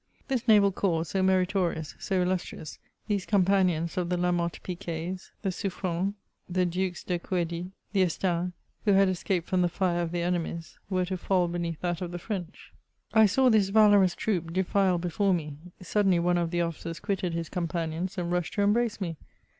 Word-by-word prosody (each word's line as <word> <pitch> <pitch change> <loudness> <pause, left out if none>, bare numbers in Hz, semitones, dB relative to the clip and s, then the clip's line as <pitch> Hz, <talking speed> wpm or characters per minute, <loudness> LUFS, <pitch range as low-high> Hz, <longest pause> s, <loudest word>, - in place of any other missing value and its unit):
This 255 -3 -1
naval 205 -3 +6
corps 170 -4 0
so 190 - 0
meritorious, 185 -4 +1
so 190 -3 0
illus 180 0 0
trious, 155 - -9 0.3
these 205 -3 0
companions 185 -5 +2
of 175 -1 0
the 180 - +1
L>amothe 175 -1 0
Piquets, 180 0 -5
the 195 - 0
Suffrens, 185 0 -2 0.3
the 180 0 +1
Dukes 180 0 -2
De 180 -2 -1
Couedies, 175 0 -2 0.2
the 195 - +3
Estaings, 180 0 0 0.3
who 205 - +4
had 195 0 +5
escaped 180 -1 -1
from 185 -1 +1
the 175 - +2
Are 175 -2 +2
of 170 -1 -2
their 175 -1 -1
enemies, 170 -1 -3
were 185 -2 +1
to 185 +1 -3
£eJ1 180 -1 +1
beneath 170 -2 -3
that 175 -1 -2
of 180 - -3
the 175 - -5
French. 180 -1 -6 0.4
I 220 -1 +7
saw 255 +6 +4
this 210 -4 +4
valorous 205 -3 +5
troop 175 -6 -1
defile 190 +1 +2
before 180 +3 +1
me: 150 -4 -5 0.3
suddenly 195 0 +2
one 175 +1 +2
of 170 -1 0
the 175 0 0
officers 165 0 -4
quitted 190 -4 -2
his 165 -1 -3
companions, 170 +2 -3
and 175 -1 -2
rushed 175 -2 -1
to 205 - +2
embrace 225 +2 +2
me. 170 -5 -3
180 Hz, 185 wpm, -28 LUFS, 170-195 Hz, 0.4 s, I